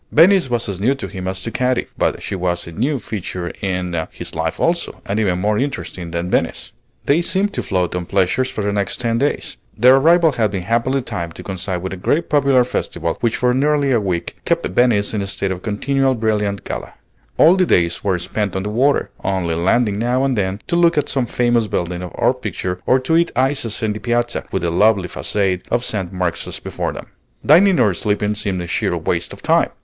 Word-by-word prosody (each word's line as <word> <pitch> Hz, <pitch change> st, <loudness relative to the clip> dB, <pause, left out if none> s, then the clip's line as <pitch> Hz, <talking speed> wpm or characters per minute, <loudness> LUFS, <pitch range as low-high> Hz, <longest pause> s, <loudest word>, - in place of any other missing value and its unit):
Venice 175 Hz, -1 st, +5 dB
was 120 Hz, -1 st, 0 dB
as 95 Hz, -2 st, -4 dB
new 130 Hz, +6 st, +2 dB
to 135 Hz, -, -6 dB
him 95 Hz, -1 st, -6 dB
as 95 Hz, 0 st, -3 dB
to 115 Hz, -, -4 dB
Katy; 125 Hz, 0 st, 0 dB
but -, -, -1 dB
she -, -, -4 dB
was 90 Hz, -2 st, -1 dB
a 85 Hz, -, -9 dB
new 130 Hz, -, 0 dB
feature 90 Hz, -6 st, -5 dB
in 90 Hz, -2 st, -2 dB, 0.2 s
his -, -, -7 dB
life 80 Hz, 0 st, -2 dB
also, 170 Hz, 0 st, 0 dB
and 100 Hz, +2 st, -1 dB
even 95 Hz, -5 st, +1 dB
more 105 Hz, +2 st, +1 dB
interesting 130 Hz, -10 st, -4 dB
than 85 Hz, +2 st, -3 dB
Venice. -, -, -1 dB, 0.3 s
They 150 Hz, +5 st, +3 dB
seemed 195 Hz, +3 st, 0 dB
to -, -, -2 dB
float 90 Hz, -3 st, -1 dB
on 90 Hz, -1 st, -3 dB
pleasures 100 Hz, +7 st, +1 dB
for 105 Hz, -, -4 dB
the 100 Hz, 0 st, 0 dB
next 100 Hz, -2 st, -2 dB
ten 115 Hz, -2 st, 0 dB
days. 145 Hz, +2 st, -1 dB, 0.2 s
Their 125 Hz, +4 st, +6 dB
arrival 165 Hz, +3 st, +5 dB
had 115 Hz, -5 st, +1 dB
been 95 Hz, -2 st, -4 dB
happily 120 Hz, +6 st, 0 dB
timed 85 Hz, -7 st, -5 dB
to -, -, -9 dB
coincide 95 Hz, -1 st, -4 dB
with 95 Hz, -, -4 dB
a -, -, -6 dB
great 145 Hz, -, 0 dB
popular 140 Hz, -3 st, +4 dB
festival 85 Hz, -8 st, -2 dB
which 115 Hz, -1 st, 0 dB
for 125 Hz, 0 st, +2 dB
nearly 140 Hz, +1 st, +2 dB
a 120 Hz, -4 st, +3 dB
week 90 Hz, -4 st, -3 dB
kept -, -, 0 dB
Venice 105 Hz, 0 st, +2 dB
in 105 Hz, -, -1 dB
a 100 Hz, -, -3 dB
state 95 Hz, 0 st, -2 dB
of 90 Hz, -1 st, -4 dB
continual 135 Hz, +6 st, 0 dB
brilliant 105 Hz, -3 st, -1 dB
gala. -, -, -6 dB, 0.4 s
All 170 Hz, +3 st, +7 dB
the 185 Hz, -2 st, +2 dB
days 85 Hz, -1 st, +1 dB
were 95 Hz, -3 st, +1 dB
spent 100 Hz, +3 st, -3 dB
on 95 Hz, -, -1 dB
the 105 Hz, -, -3 dB
water, 135 Hz, +6 st, +2 dB
only 95 Hz, -3 st, -1 dB
landing 100 Hz, +5 st, +1 dB
now 125 Hz, +3 st, +1 dB
and 135 Hz, -2 st, +1 dB
then 95 Hz, -1 st, -1 dB
to -, -, -1 dB
look 170 Hz, -1 st, +4 dB
at 150 Hz, -, +1 dB
some 130 Hz, -3 st, 0 dB
famous 120 Hz, -2 st, +1 dB
building 90 Hz, -2 st, -2 dB
or 90 Hz, -, 0 dB
picture, 90 Hz, 0 st, -4 dB
or 130 Hz, -, +5 dB
to 160 Hz, +6 st, +2 dB
eat 170 Hz, 0 st, +3 dB
ices 130 Hz, -4 st, 0 dB
in 110 Hz, -1 st, +1 dB
the 105 Hz, -, -6 dB
Piazza 120 Hz, 0 st, -1 dB
with 95 Hz, -, -2 dB
the 85 Hz, -, 0 dB
lovely 100 Hz, +1 st, +3 dB
façade 95 Hz, 0 st, -1 dB
of 120 Hz, +1 st, 0 dB
St. 95 Hz, -5 st, -2 dB
Mark's 90 Hz, -3 st, -3 dB
before -, -, -3 dB
them. -, -, -8 dB, 0.4 s
Dining 180 Hz, +5 st, +6 dB
or 100 Hz, -, +4 dB
sleeping 105 Hz, +3 st, 0 dB
seemed 100 Hz, -4 st, -2 dB
a -, -, -5 dB
sheer -, -, -1 dB
waste -, -, -2 dB
of -, -, -11 dB
time! -, -, +3 dB
105 Hz, 220 wpm, -19 LUFS, 95-130 Hz, 0.4 s, All